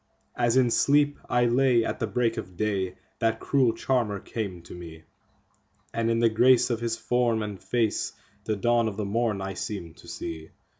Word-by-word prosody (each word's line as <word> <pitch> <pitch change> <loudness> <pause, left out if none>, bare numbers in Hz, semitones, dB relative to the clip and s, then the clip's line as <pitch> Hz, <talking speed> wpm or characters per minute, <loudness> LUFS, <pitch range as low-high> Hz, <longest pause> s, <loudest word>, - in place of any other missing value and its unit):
As 120 0 +2
in 125 -2 +4
sleep 145 +3 +3
I 120 0 +3
lay 120 -1 +3
at - - -3
the 115 - -1
break 115 +2 0
of 95 -5 -7
day 95 -3 -1 0.2
that 115 0 +1
cruel 130 -4 +2
charmer 115 -3 0
came 95 -5 -5
to - - -11
me, 80 -2 -10 0.9
And 115 0 0
in 115 - +2
the 115 0 +4
grace 125 +3 +4
of 115 - 0
his 115 -1 -2
form 120 -3 +1
and 105 -2 -6
face 115 -3 0 0.3
the 110 - 0
dawn 120 +2 +2
of 105 -2 -4
the 105 - -2
morn 110 -1 0
I 95 0 -4
seemed 90 -5 -6
to - - -16
see. 80 -1 -6
115 Hz, 190 wpm, -26 LUFS, 100-120 Hz, 0.9 s, in